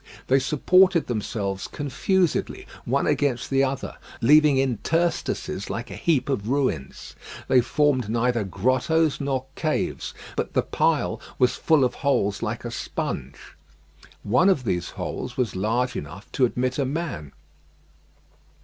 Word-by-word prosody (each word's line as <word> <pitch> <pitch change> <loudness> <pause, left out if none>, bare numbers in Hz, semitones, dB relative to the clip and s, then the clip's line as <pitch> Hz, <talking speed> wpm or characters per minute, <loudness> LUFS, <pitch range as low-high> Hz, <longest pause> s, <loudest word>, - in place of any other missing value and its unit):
They 135 +1 +5
supported 175 +6 +4
themselves 105 -4 -3
confusedly 170 +5 -1 0.2
one - - +1
against 130 -3 0
the 135 0 +3
other, 135 0 -3 0.2
leaving 150 +2 +5
interstices 135 - -1
like 120 +2 -5
a - - -6
heap 155 -6 +1
of 115 -6 -2
ruins. 130 - -2 0.3
They 130 - +5
formed 130 -3 +1
neither 120 0 +1
grottoes 135 - +1
nor 135 -2 -1
caves, 155 -2 -2 0.2
but - - -3
the - - +2
pile - - 0 0.2
was 125 -1 +3
full 155 -4 +3
of 125 - +1
holes 105 -9 +1
like - - -3
a - - -4
sponge. 65 +2 -4 0.9
One 125 - +4
of 150 -9 +2
these 90 -6 -1
holes 125 -1 -5
was 125 -6 -1
large 115 +6 0
enough 80 +8 -8
to 130 - +3
admit 125 +2 -1
a 140 - +1
man. 135 - -4
130 Hz, 135 wpm, -24 LUFS, 115-145 Hz, 0.9 s, They